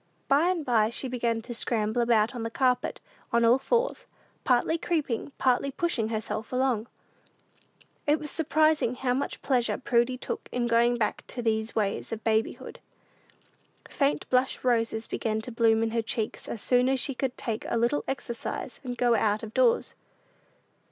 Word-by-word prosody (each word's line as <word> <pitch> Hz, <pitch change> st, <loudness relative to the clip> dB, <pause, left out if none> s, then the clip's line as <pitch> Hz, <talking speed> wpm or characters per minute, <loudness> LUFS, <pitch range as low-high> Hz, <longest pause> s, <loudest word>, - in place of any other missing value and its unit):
By 295 Hz, +6 st, +4 dB
and 345 Hz, -5 st, -1 dB
by 220 Hz, -3 st, +3 dB
she 240 Hz, +3 st, -5 dB
began 235 Hz, -2 st, -1 dB
to 240 Hz, -, -6 dB
scramble 225 Hz, 0 st, 0 dB
about 230 Hz, -1 st, +3 dB
on 245 Hz, -, -5 dB
the 225 Hz, -, -2 dB
carpet 250 Hz, +1 st, 0 dB, 0.3 s
on 235 Hz, 0 st, +3 dB
all 240 Hz, +3 st, +5 dB
fours, 485 Hz, -, 0 dB, 0.4 s
partly 255 Hz, +5 st, +2 dB
creeping, 305 Hz, -7 st, -2 dB
partly 260 Hz, +2 st, +2 dB
pushing 275 Hz, -, -1 dB
herself 220 Hz, 0 st, -4 dB
along. 250 Hz, -3 st, 0 dB, 1.2 s
It 295 Hz, +1 st, +4 dB
was 300 Hz, 0 st, -2 dB
surprising 310 Hz, -4 st, +2 dB
how 250 Hz, 0 st, 0 dB
much 270 Hz, +3 st, -3 dB
pleasure 250 Hz, -4 st, +1 dB
Prudy 240 Hz, 0 st, +1 dB
took -, -, -5 dB
in 245 Hz, -1 st, -1 dB
going 235 Hz, +1 st, +3 dB
back 215 Hz, -3 st, -1 dB
to 245 Hz, -, -5 dB
these 220 Hz, 0 st, 0 dB
ways 205 Hz, -3 st, -1 dB
of 225 Hz, -1 st, -5 dB
babyhood. 220 Hz, 0 st, -1 dB, 1.1 s
Faint 280 Hz, 0 st, 0 dB
blush 255 Hz, +1 st, +1 dB
roses 230 Hz, -2 st, +1 dB
began 220 Hz, -1 st, -2 dB
to 245 Hz, -, -7 dB
bloom 225 Hz, -1 st, +3 dB
in 225 Hz, -, -1 dB
her 230 Hz, 0 st, +1 dB
cheeks 220 Hz, 0 st, -4 dB
as 220 Hz, -, -5 dB
soon 250 Hz, 0 st, +3 dB
as 265 Hz, 0 st, +1 dB
she 275 Hz, +2 st, 0 dB
could 260 Hz, 0 st, -3 dB
take 225 Hz, -2 st, -3 dB
a -, -, 0 dB
little 240 Hz, +5 st, +1 dB
exercise 240 Hz, -3 st, -5 dB
and 245 Hz, -2 st, -5 dB
go 240 Hz, -1 st, +3 dB
out 215 Hz, -1 st, +1 dB
of 220 Hz, 0 st, -7 dB
doors. 485 Hz, -1 st, +2 dB
240 Hz, 170 wpm, -27 LUFS, 225-265 Hz, 1.2 s, all